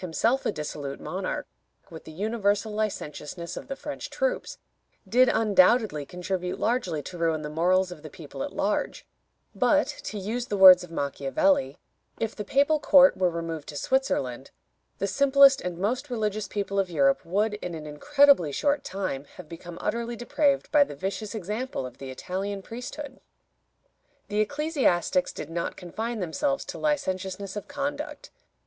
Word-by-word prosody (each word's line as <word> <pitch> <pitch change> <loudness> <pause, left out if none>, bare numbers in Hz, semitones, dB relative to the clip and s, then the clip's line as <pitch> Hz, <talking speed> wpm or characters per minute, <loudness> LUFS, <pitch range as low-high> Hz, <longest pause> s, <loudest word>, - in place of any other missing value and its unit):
himself 225 +9 0
a - - +1
dissolute 145 -4 -5
monarch, - - -4 0.5
with 160 - -10
the - - -9
universal 205 +3 0
licentiousness 170 -5 -4
of - - -8
the 275 - -4
French 290 +1 -6
troops, - - -2 0.5
did 255 +1 +5
undoubtedly 205 - +3
contribute 180 0 -3
largely 185 - 0
to 175 +3 -8
ruin 160 -2 0
the 150 - -5
morals 180 +3 +2
of 165 -4 -9
the 155 - -9
people 140 -3 -9
at - - -3
large, 205 +1 -1 0.5
but, - - +3
to 215 - -6
use 230 +5 -3
the 205 - -2
words 185 -2 +9
of 180 - -10
Machiavelli, 270 - 0 0.4
"If 225 0 -2
the 210 - -4
papal 285 +7 +2
court 280 -1 +6
were 185 -1 +2
removed 165 -2 -5
to 150 - -8
Switzerland, 140 - -1 0.5
the - - -1
simplest 275 +4 +5
and 180 -1 -4
most 250 +9 -1
religious 215 -3 -2
people 200 0 -2
of 190 -2 0
Europe 140 -5 +2
would, 205 +5 0
in 180 -5 -5
an 155 -1 -7
incredibly 275 - +4
short 285 - 0
time, 185 -8 -4
have 180 -4 -11
become 170 +1 -9
utterly 235 +2 -2
depraved 275 +4 +1
by 295 -1 +6
the 280 - -8
vicious 195 +7 -4
example 210 - -3
of 125 -1 -10
the 135 - -7
Italian 195 +8 -4
priesthood." 260 +5 -7 1.1
The 210 0 -1
ecclesiastics 255 - +1
did - - -8
not 170 0 -3
confine 220 +5 -4
themselves 275 - -1
to - - -7
licentiousness 195 -10 -2
of 205 - -6
conduct. 290 +1 -5
200 Hz, 160 wpm, -26 LUFS, 170-255 Hz, 1.1 s, words